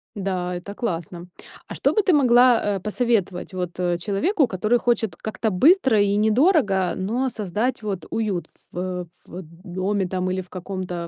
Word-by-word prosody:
Да, 185 Hz, -3 st, -2 dB
это 180 Hz, +3 st, -7 dB
классно. 175 Hz, -5 st, -4 dB, 0.4 s
А -, -, -7 dB
что -, -, +1 dB
бы 430 Hz, -, +3 dB
ты 385 Hz, -, +2 dB
могла, 250 Hz, -5 st, +5 dB
э, -, -, -3 dB
посоветовать 210 Hz, -4 st, -1 dB
вот 180 Hz, -2 st, -4 dB
человеку, 195 Hz, -, 0 dB
который 215 Hz, +2 st, +1 dB
хочет 235 Hz, -3 st, 0 dB
как-то 220 Hz, 0 st, -3 dB
быстро 265 Hz, -, +4 dB
и 200 Hz, 0 st, +2 dB
недорого, 215 Hz, -, +2 dB
но 235 Hz, +8 st, -1 dB
создать 220 Hz, +3 st, -2 dB
вот 195 Hz, -6 st, -4 dB
уют 205 Hz, -6 st, -2 dB, 0.3 s
в 180 Hz, 0 st, -4 dB, 0.2 s
в 180 Hz, -, -8 dB, 0.2 s
доме 190 Hz, +1 st, -2 dB
там 185 Hz, 0 st, -2 dB
или 185 Hz, 0 st, -2 dB
в 180 Hz, -, -16 dB
каком-то, 185 Hz, -2 st, -5 dB
200 Hz, 155 wpm, -23 LUFS, 180-235 Hz, 0.4 s, могла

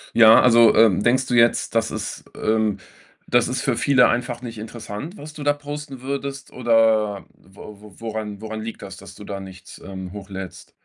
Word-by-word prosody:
Ja, 110 Hz, -1 st, +8 dB
also, 115 Hz, -2 st, +6 dB
ähm, 110 Hz, -5 st, +5 dB
denkst 125 Hz, +3 st, +2 dB
du 125 Hz, -, -3 dB
jetzt, 115 Hz, -1 st, +3 dB
das 115 Hz, 0 st, +1 dB
ist -, -, -6 dB
ähm, 110 Hz, -2 st, 0 dB, 0.5 s
das 120 Hz, -1 st, +3 dB
ist 125 Hz, 0 st, -2 dB
für -, -, +1 dB
viele 130 Hz, -3 st, +4 dB
einfach 120 Hz, +1 st, -2 dB
nicht 115 Hz, -2 st, -7 dB
interessant, 115 Hz, -, -8 dB
was 150 Hz, -2 st, -10 dB
du 155 Hz, -, -10 dB
da 145 Hz, 0 st, +2 dB
posten 145 Hz, -2 st, -8 dB
würdest, 140 Hz, +1 st, -5 dB
oder 110 Hz, -4 st, +2 dB
wo 100 Hz, +2 st, -14 dB
wo 105 Hz, -3 st, -15 dB
woran 110 Hz, -2 st, -5 dB
woran 110 Hz, 0 st, -6 dB
liegt 115 Hz, +1 st, -7 dB
das, 95 Hz, -1 st, -8 dB
dass 100 Hz, 0 st, -12 dB
du 105 Hz, -, -11 dB
da 100 Hz, -1 st, -6 dB
nichts, 95 Hz, -1 st, -12 dB
ähm, 95 Hz, -1 st, -8 dB
hochlädst? 95 Hz, -2 st, -9 dB
115 Hz, 190 wpm, -22 LUFS, 105-125 Hz, 0.5 s, Ja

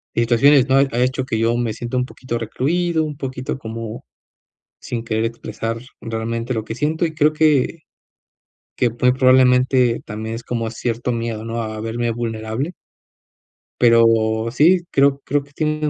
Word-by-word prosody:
situaciones 125 Hz, +4 st, +4 dB
no 130 Hz, -, +4 dB
ha -, -, +6 dB
ha 120 Hz, -, -2 dB
hecho 130 Hz, +1 st, 0 dB
que 120 Hz, -4 st, -2 dB
yo 115 Hz, +1 st, +1 dB
me 120 Hz, -2 st, -1 dB
sienta 120 Hz, +3 st, -4 dB
un 125 Hz, -, +1 dB
poquito 125 Hz, -2 st, -5 dB
recluido, 160 Hz, +9 st, 0 dB
un 150 Hz, -2 st, -5 dB
poquito 130 Hz, -2 st, -4 dB
como 115 Hz, -1 st, -7 dB, 0.7 s
sin 115 Hz, -1 st, -5 dB
querer 110 Hz, -1 st, -1 dB
expresar 115 Hz, 0 st, -4 dB, 0.2 s
realmente 115 Hz, +1 st, -3 dB
lo 110 Hz, -3 st, -2 dB
que 110 Hz, -, -5 dB
siento. 155 Hz, +6 st, 0 dB
Y 160 Hz, -, -6 dB
creo 155 Hz, 0 st, +3 dB
que 155 Hz, 0 st, +2 dB, 1.0 s
que 125 Hz, -, +2 dB
muy 125 Hz, +2 st, +2 dB
probablemente 130 Hz, -1 st, +4 dB
también 110 Hz, +1 st, -5 dB
es 120 Hz, -, -8 dB
como 115 Hz, -2 st, -2 dB
cierto 120 Hz, +1 st, -3 dB
miedo, 115 Hz, -2 st, -3 dB
¿no?, 115 Hz, 0 st, -3 dB
a 110 Hz, -1 st, -5 dB
verme 115 Hz, +1 st, -2 dB
vulnerable. 115 Hz, +6 st, -3 dB, 1.1 s
Pero 115 Hz, -1 st, +4 dB
sí, 170 Hz, +7 st, +4 dB
creo 140 Hz, 0 st, +3 dB
creo 145 Hz, 0 st, 0 dB
que 145 Hz, -, -22 dB
tienes 155 Hz, +1 st, -1 dB
120 Hz, 160 wpm, -20 LUFS, 115-135 Hz, 1.1 s, ha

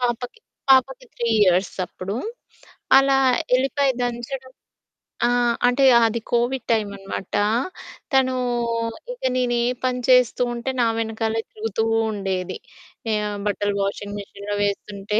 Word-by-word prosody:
పాపకి, 245 Hz, -, -2 dB, 0.3 s
పాపకి 270 Hz, -, +4 dB
3 235 Hz, -1 st, -2 dB
ఇయర్స్ 185 Hz, 0 st, +2 dB
అప్పుడు. 195 Hz, +4 st, -6 dB, 0.8 s
అలా 270 Hz, 0 st, +4 dB, 0.4 s
ఎల్లిపాయి 270 Hz, +1 st, +1 dB
దంచడం 245 Hz, +2 st, -4 dB, 0.8 s
ఆ! -, -, +2 dB, 0.4 s
అంటే 270 Hz, +2 st, +3 dB, 0.2 s
అది 230 Hz, +1 st, 0 dB
కోవిడ్ 245 Hz, +2 st, 0 dB
టైమ్ 215 Hz, -3 st, +1 dB
అనమాట. 195 Hz, 0 st, -7 dB, 0.8 s
తనూ 260 Hz, -1 st, +3 dB, 0.8 s
ఇక -, -, -16 dB
నేను 245 Hz, -1 st, +1 dB
ఏ -, -, +1 dB, 0.2 s
పని 250 Hz, 0 st, 0 dB
చేస్తూ 250 Hz, -1 st, +5 dB
ఉంటే, 240 Hz, +3 st, -3 dB
నా 235 Hz, -, +4 dB
వెనకాలే 225 Hz, 0 st, -1 dB
తిరుగుతూ 225 Hz, 0 st, -3 dB, 0.3 s
ఉండేది. 190 Hz, -3 st, -3 dB, 0.6 s
ఆహ్, 210 Hz, -1 st, -1 dB
బట్టలు 205 Hz, 0 st, -1 dB
వాషింగ్ 205 Hz, +1 st, -4 dB
మిషన్‌లో 200 Hz, +1 st, -6 dB
వేస్తుంటే 205 Hz, +1 st, -2 dB
230 Hz, 120 wpm, -22 LUFS, 205-255 Hz, 0.8 s, చేస్తూ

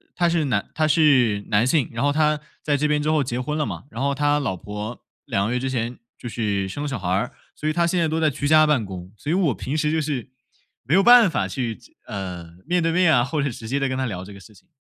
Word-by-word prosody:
他 175 Hz, -1 st, +2 dB
是 165 Hz, -3 st, +1 dB
男 110 Hz, -7 st, -1 dB
他 155 Hz, -1 st, +1 dB
是 130 Hz, -10 st, +3 dB
男 110 Hz, +3 st, +3 dB
性， 140 Hz, -2 st, +2 dB
然 115 Hz, +3 st, -3 dB
后 145 Hz, -, +3 dB
他 150 Hz, 0 st, +2 dB, 0.2 s
在 145 Hz, -1 st, +1 dB
这 150 Hz, +2 st, +1 dB
边 150 Hz, 0 st, +1 dB
之 155 Hz, -, +1 dB
后 150 Hz, -3 st, +2 dB
结 120 Hz, -1 st, -3 dB
婚 150 Hz, +4 st, -3 dB
了 150 Hz, -, 0 dB
嘛。 -, -, -6 dB
然 120 Hz, -, -6 dB
后 140 Hz, 0 st, +1 dB
他 145 Hz, +1 st, +2 dB
老 120 Hz, -10 st, -2 dB
婆 105 Hz, +5 st, -7 dB, 0.2 s
2 100 Hz, +1 st, 0 dB
个 120 Hz, -, -1 dB
月 125 Hz, -, 0 dB
之 130 Hz, +1 st, -2 dB
前 120 Hz, -1 st, -3 dB, 0.2 s
就 120 Hz, -, -7 dB
是 100 Hz, -4 st, -1 dB
生 145 Hz, +8 st, -4 dB
小 135 Hz, -4 st, -3 dB
孩 90 Hz, -2 st, -4 dB
儿， 100 Hz, +7 st, 0 dB, 0.2 s
所 155 Hz, -, -4 dB
以 155 Hz, -, +1 dB
他 170 Hz, 0 st, +2 dB
现 175 Hz, +1 st, +1 dB
在 165 Hz, -, +2 dB
都 160 Hz, +1 st, -1 dB
在 155 Hz, -, +4 dB
居 145 Hz, +1 st, -3 dB
家 155 Hz, 0 st, +6 dB
办 145 Hz, -8 st, +2 dB
公。 95 Hz, -1 st, -8 dB
所 145 Hz, -, -7 dB
以 -, -, +2 dB
我 175 Hz, -7 st, +2 dB
平 130 Hz, +9 st, -4 dB
时 150 Hz, 0 st, +1 dB
就 160 Hz, -, +1 dB
是 140 Hz, -4 st, -3 dB, 0.5 s
没 135 Hz, +9 st, +1 dB
有 195 Hz, -, +5 dB
办 240 Hz, -4 st, +8 dB
法 -, -, -1 dB
去 120 Hz, -4 st, -3 dB
这 120 Hz, -, -20 dB
呃， 90 Hz, -6 st, -6 dB
面 175 Hz, +2 st, +1 dB
对 165 Hz, 0 st, +1 dB
面 180 Hz, -3 st, +4 dB
啊， 120 Hz, -2 st, +4 dB
或 150 Hz, +2 st, -2 dB
者 140 Hz, -, 0 dB
直 110 Hz, -1 st, -8 dB
接 135 Hz, -, -1 dB
地 135 Hz, -1 st, 0 dB
跟 130 Hz, -, -2 dB
他 130 Hz, -, -1 dB
聊 90 Hz, -6 st, -4 dB
这 100 Hz, -, -11 dB
个 100 Hz, -, -12 dB
事 105 Hz, +3 st, -16 dB
情。 95 Hz, -, -22 dB
135 Hz, 305 characters per minute, -23 LUFS, 110-155 Hz, 0.5 s, 办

